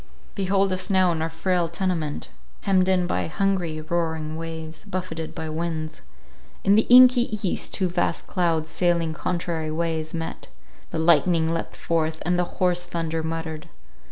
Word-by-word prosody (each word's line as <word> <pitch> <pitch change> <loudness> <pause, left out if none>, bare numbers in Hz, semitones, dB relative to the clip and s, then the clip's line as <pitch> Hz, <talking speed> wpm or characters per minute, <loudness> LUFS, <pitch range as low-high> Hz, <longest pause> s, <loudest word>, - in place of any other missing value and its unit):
Behold 195 0 +1
us 185 +2 -3
now 185 -2 +4
in 160 -1 -2
our 160 - -1
frail 170 +1 0
tenement, 165 -4 -2 0.3
hemmed 190 -2 +2
in 185 -1 +3
by 175 - -1
hungry, 170 -2 -1
roaring 160 -1 -2
waves, 160 -1 -7
buffeted 185 -5 -5
by 160 - -4
winds. 155 0 -4 0.6
In 195 - +5
the 215 +2 +4
inky 250 -3 +7
east - - -2
two 190 - +1
vast 175 -1 -1
clouds, 165 -4 0
sailing 170 -1 +1
contrary 165 -1 -2
ways, 160 0 -2
met; 165 0 -5 0.4
the - - -4
lightning 165 0 +3
leapt 165 - -4
forth, 160 -1 -1
and 175 +1 +1
the 180 - +2
hoarse 175 -1 +1
thunder 165 -2 -2
muttered. 160 0 -5
170 Hz, 155 wpm, -24 LUFS, 160-185 Hz, 0.6 s, inky